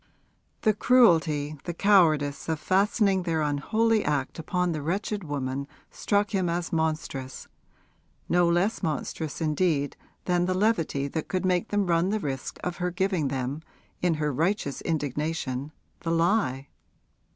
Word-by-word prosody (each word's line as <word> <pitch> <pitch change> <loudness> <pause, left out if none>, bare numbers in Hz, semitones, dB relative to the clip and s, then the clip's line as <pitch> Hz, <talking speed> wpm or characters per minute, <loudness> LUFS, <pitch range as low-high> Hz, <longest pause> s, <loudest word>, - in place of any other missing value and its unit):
The 215 - +3
cruelty, 160 - +3
the 175 - -4
cowardice 160 -8 +3
of 160 -2 -1
fastening 195 +2 +2
their 165 -3 0
unholy 215 +10 +1
act 145 0 -1
upon 180 +2 0
the 155 -2 -3
wretched 195 +6 -2
woman 140 -2 -3 0.2
struck 205 0 0
him 190 -4 0
as 170 +1 -2
monstrous 155 -5 -2 0.8
no 175 0 +3
less 180 +6 +1
monstrous 155 -2 -3
indeed 155 -2 +1 0.3
than 175 -1 +2
the 185 - 0
levity 185 -9 +1
that 160 +2 -4
could 185 0 -1
make 180 +2 +1
them 205 -1 0
run 170 +1 +2
the 215 +1 0
risk 135 -6 -4
of 180 -1 -3
her 180 -1 -1
giving 180 -4 0
them, 135 +2 -3 0.4
in 175 -2 +2
her 150 -1 -1
righteous 165 -1 -1
indignation, 150 -2 -2 0.3
the 165 - -4
lie. 165 - +1
165 Hz, 140 wpm, -27 LUFS, 145-190 Hz, 0.8 s, The